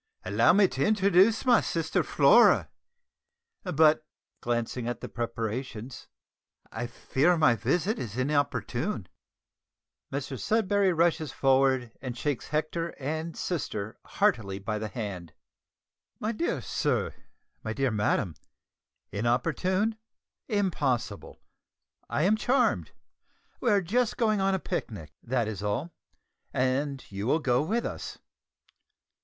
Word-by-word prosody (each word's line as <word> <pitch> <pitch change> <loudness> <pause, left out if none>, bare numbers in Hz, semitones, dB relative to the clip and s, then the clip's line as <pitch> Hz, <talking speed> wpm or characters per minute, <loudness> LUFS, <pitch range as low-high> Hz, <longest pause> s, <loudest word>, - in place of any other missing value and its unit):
"Allow 105 +5 +4
me 200 0 +5
to 130 -2 -2
introduce 200 +1 +4
my 240 -4 +5
sister, 165 -1 0
Flora; - - +5 0.9
but," 155 -3 +3 0.4
(glancing 120 0 -2
at 120 - -3
the - - -6
preparations), 115 +1 -5 0.6
"I 120 - -4
fear 135 +7 +1
that - - 0
my 155 -7 +5
visit 175 - 0
is 115 -1 -5
inopportune." 145 +2 -1 1.0
Mr 135 -2 -4
Sudberry 205 -3 +2
rushes 165 -3 +1
forward 130 -3 +2
and 125 -3 -5
shakes 145 -4 -2
Hector 155 +2 -2
and 160 +4 -4
sister 110 - -3
heartily 100 -4 0
by 105 +2 -3
the 110 - -3
hand. 95 -6 -6 0.9
"My 215 - -1
dear 285 +10 -2
sir, - - -1 0.5
my 110 - -3
dear 135 +2 0
madam, 105 -3 0 0.8
inopportune! 180 - 0 0.5
impossible! 145 - -1 0.7
I 150 - 0
am 200 +5 +4
charmed. 255 +5 +1 0.7
We 245 - +1
are 205 -2 +4
just 235 +6 0
going 215 -4 +2
on 195 0 +2
a - - -1
picnic, 80 - -5
that 120 -2 -1
is 105 -3 -5
all, 105 +11 -2 0.6
and 130 +2 -1
you 100 +2 -4
will 150 - +3
go 125 -6 +1
with 220 +10 -1
us. - - -5
135 Hz, 120 wpm, -28 LUFS, 115-185 Hz, 1.0 s, me